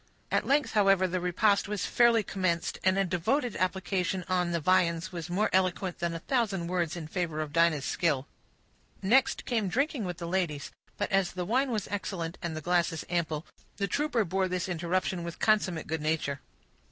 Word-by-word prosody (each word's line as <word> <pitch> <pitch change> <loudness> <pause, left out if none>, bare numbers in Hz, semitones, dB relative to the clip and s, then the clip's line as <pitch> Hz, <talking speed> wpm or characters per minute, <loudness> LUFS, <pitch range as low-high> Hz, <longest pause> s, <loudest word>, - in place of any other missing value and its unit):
At - - +1
length, 285 +1 +2
however, 195 -3 +4
the 185 +1 -1
repast 195 +4 +2
was 210 -1 -2
fairly 235 -2 +4
commenced, 185 -4 -1
and 185 +1 +3
a 195 - +3
devoted 200 - 0
application 185 0 -1
to 185 -1 +1
the 170 - 0
viands 170 0 +2
was 170 -1 -6
more 195 +5 +1
eloquent 185 0 +1
than 170 -1 -1
a - - -4
thousand 210 -9 0
words 175 -3 -1
in 170 -3 -6
favor 165 -2 -2
of 155 -2 -4
Dinah's 165 -4 +3
skill. 150 -7 0 0.8
Next 255 +7 +3
came 225 -5 0
drinking 275 - 0
with 180 -2 -4
the 170 - -5
ladies; 170 -5 -1 0.3
but 205 - -2
as 195 -2 +2
the 180 -1 -3
wine 260 +7 +1
was 215 -5 -2
excellent, 185 -4 -4
and 165 -3 -3
the - - -4
glasses 170 -1 0
ample, 160 -2 -1 0.3
the 200 -1 0
trooper 250 -1 0
bore 190 +2 0
this 185 -1 -2
interruption 175 +1 -1
with 170 -1 -6
consummate 190 -7 +1
good 160 0 -3
nature. 150 -2 -1
180 Hz, 185 wpm, -29 LUFS, 170-200 Hz, 0.8 s, however